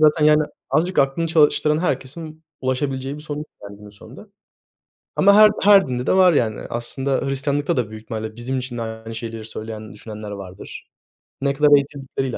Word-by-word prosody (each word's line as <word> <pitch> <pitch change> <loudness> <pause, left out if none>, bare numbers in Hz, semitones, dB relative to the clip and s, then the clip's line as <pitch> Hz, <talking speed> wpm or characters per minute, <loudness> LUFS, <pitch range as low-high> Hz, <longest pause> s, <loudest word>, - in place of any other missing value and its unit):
Zaten, 155 0 +4
yani, 150 0 +5 0.3
azıcık 170 +6 +1
aklını 140 +5 +2
çalıştıran 150 -1 +3
herkesin 155 +1 -4 0.2
ulaşabileceği 135 +1 -2
bir - - -9
sonuç 150 0 -5
var 100 - -10
günün 105 0 -13
sonunda. 115 - -14 0.9
Ama 200 +1 +6
her 215 0 +8
her 200 -4 +6
dinde 125 0 -3
de - - +2
var 185 -2 +6
yani. 110 -7 0
Aslında 130 +4 -3
Hristiyanlık'ta 140 +1 -1
da 115 -4 -1
büyük 110 0 -9
ihtimalle 110 0 -6
bizim 130 +2 -3
için 125 -1 -5
de - - -2
aynı 110 0 -7
şeyleri 115 -1 -6
söyleyen, 110 -1 -8
düşünenler 105 0 -9
vardır. 95 -2 -9 0.5
Ne 140 0 +1
kadar 145 +1 +5
eğitildikleriyle 135 -2 -3
135 Hz, 170 wpm, -21 LUFS, 110-150 Hz, 0.9 s, her